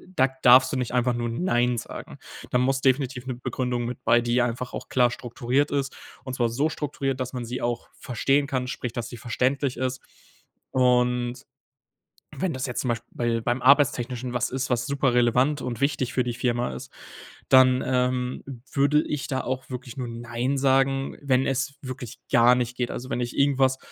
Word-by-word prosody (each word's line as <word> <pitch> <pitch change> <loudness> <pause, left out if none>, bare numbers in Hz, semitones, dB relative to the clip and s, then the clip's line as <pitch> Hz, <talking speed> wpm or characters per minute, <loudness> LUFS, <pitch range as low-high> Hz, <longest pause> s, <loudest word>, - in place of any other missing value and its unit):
da 130 - +4
darfst 130 +3 +7
du - - 0
nicht 125 -1 -3
einfach 125 0 +2
nur 120 -1 -2
„nein“ 120 -3 +1
sagen. - - -7 0.3
Da 125 - +2
muss 135 +2 +1
definitiv 130 -1 +1
'ne 130 - -3
Begründung 125 -1 -2
mit 125 - -6
bei, 120 +1 +5
die 120 0 -1
ja 120 0 +3
einfach 125 +2 -5
auch - - -6
klar 125 -2 +3
strukturiert 125 +4 -1
ist. 140 -1 -2 0.3
Und 130 -1 -6
zwar 120 -3 +1
so 140 +7 0
strukturiert, 135 -3 -3
dass 130 0 -4
man 125 -2 -4
sie 125 +2 -5
auch 120 0 -2
verstehen 135 +3 +1
kann, 130 -2 -1
sprich, 125 -2 -4
dass 120 0 -4
sie 120 - -8
verständlich 125 +3 -1
ist. 130 0 -2 0.7
Und 125 -1 +1 0.9
wenn 190 -2 0
das 130 0 -3
jetzt 125 -3 -3
zum 125 - -2
Beisp 115 0 -1
bei 120 -1 -1
beim 120 +2 -1
Arbeitstechnischen 130 -3 +3
was 120 - 0
ist, 130 0 -3
was 120 -1 0
super 140 -2 +1
relevant 125 +4 +3
und 120 -3 -4
wichtig 135 -3 0
für 125 - +2
die 120 - -2
Firma 120 - -1
ist, 65 - -9 0.6
dann, 130 -1 +6
ähm, 125 0 0 0.3
würde 145 +2 +3
ich 145 -2 -3
da 130 -1 -1
auch 130 0 -4
wirklich 125 -2 -7
nur 125 -2 -3
„nein“ 120 +3 -2
sagen, 135 0 +2
wenn 135 -2 +2
es 140 +1 -1
wirklich 130 -3 -7
gar 120 +1 +6
nicht 125 0 -2
geht. 125 -1 -1
Also 130 +1 -6
wenn 125 - -1
ich 120 0 -4
irgendwas 135 -2 +3
125 Hz, 195 wpm, -25 LUFS, 120-135 Hz, 0.9 s, darfst